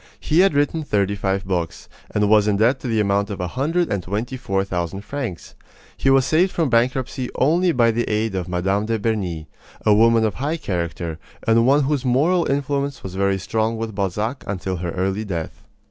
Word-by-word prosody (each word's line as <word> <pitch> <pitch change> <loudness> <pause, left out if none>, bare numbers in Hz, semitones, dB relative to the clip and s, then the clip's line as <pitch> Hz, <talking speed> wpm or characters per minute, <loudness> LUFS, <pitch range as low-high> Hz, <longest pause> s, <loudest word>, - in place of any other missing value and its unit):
He 160 +2 +1
had 190 -5 +4
written 145 +3 +1
thirty 100 -7 0
five 95 -1 -1
books, 90 -3 -3 0.2
and 105 0 +1
was 105 0 +4
in 100 -1 +2
debt 120 +5 +3
to - - -6
the 115 -2 +1
amount 100 0 +1
of 100 - -5
a 90 -1 -2
hundred 160 - 0
and 100 - -1
twenty 105 +8 -3
four 95 -7 -1
thousand 90 0 -3
francs. 125 -7 -6 0.4
He 135 - +1
was 135 -1 +5
saved 170 +6 +3
from 160 -7 0
bankruptcy 125 +2 0
only 170 +6 +3
by 120 -5 +3
the 120 +1 -1
aid 110 0 0
of 90 -2 -3
Mme. 95 +4 0
de 115 0 0
Berny, 95 -8 -2 0.4
a 105 - +6
woman 115 +1 +4
of 110 - 0
high 150 +5 -2
character, 85 - -3 0.3
and 115 +1 +4
one 140 +2 +4
whose 140 -1 0
moral 155 +8 +2
influence 140 0 -1
was 95 - -6
very 100 0 +1
strong 110 +3 -1
with 110 -1 -4
Balzac 105 +6 -2
until 95 -1 -3
her 85 0 -4
early 95 +3 -1
death. 85 -6 -5
110 Hz, 200 wpm, -21 LUFS, 95-135 Hz, 0.4 s, a